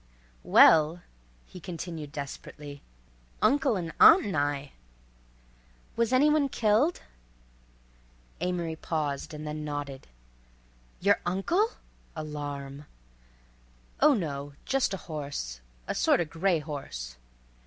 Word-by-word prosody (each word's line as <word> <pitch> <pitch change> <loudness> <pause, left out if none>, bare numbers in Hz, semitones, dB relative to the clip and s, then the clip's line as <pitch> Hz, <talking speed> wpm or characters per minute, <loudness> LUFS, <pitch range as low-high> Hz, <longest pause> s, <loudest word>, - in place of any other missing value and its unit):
"Well," 160 - +6 0.4
he 180 - -12
continued 165 -3 -6
desperately, 145 0 -8 0.6
"uncle 270 -5 +3
'n 165 -3 -5
aunt 340 +4 +8
'n 200 - -3
I." 145 -1 -1 1.2
"Was 230 0 +1
any 260 +3 +5
one 300 -2 +3
killed?" 235 +9 +2 1.4
Amory 175 -2 -2
paused 150 -3 -3
and 155 0 -7
then 150 0 -4
nodded. 145 -2 -5 0.9
"Your 200 +2 +4
uncle?"—alarm. 150 - -3 1.1
"Oh, 295 0 +6
no 145 -7 -4
just 270 -5 +1
a - - -11
horse—a - - -6
sorta 175 - +2
gray 165 +3 +1
horse." 65 - -6
155 Hz, 95 wpm, -28 LUFS, 145-195 Hz, 1.4 s, aunt